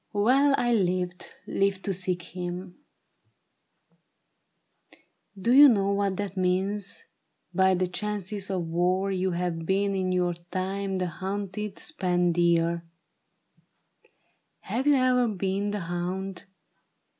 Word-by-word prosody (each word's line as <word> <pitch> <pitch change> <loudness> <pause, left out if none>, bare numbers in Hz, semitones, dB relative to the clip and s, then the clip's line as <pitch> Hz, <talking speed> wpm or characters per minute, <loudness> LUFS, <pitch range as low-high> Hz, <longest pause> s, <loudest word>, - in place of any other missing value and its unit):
" - - -45
Well, 265 +7 +4
I 240 0 +2
lived— 180 -3 -1
lived 195 -1 0
to 195 - 0
seek 180 -1 -1
him. 180 +2 -6 2.6
Do 235 +6 +2
you 285 +2 +10
know 200 -4 +2
what 200 -1 0
that 200 -1 -4
means? 190 +2 -1 0.5
By 190 +1 +4
the 185 +1 +1
chances 200 +1 -3
of 185 -3 -1
war 180 +4 +1
You 190 0 0
have 170 -1 -2
been 200 +1 +1
in 185 -1 -1
your 180 -1 +1 0.2
time 190 +1 -2
the 185 -1 0
hunted, 195 +3 -4
spent 180 - 0
deer; 170 0 +2 1.8
Have 260 +4 -2
you 290 - +6
e'er 255 -2 +3
been 195 0 -1
the 205 -1 -3
hound 180 +2 -4
190 Hz, 120 wpm, -27 LUFS, 180-205 Hz, 2.6 s, you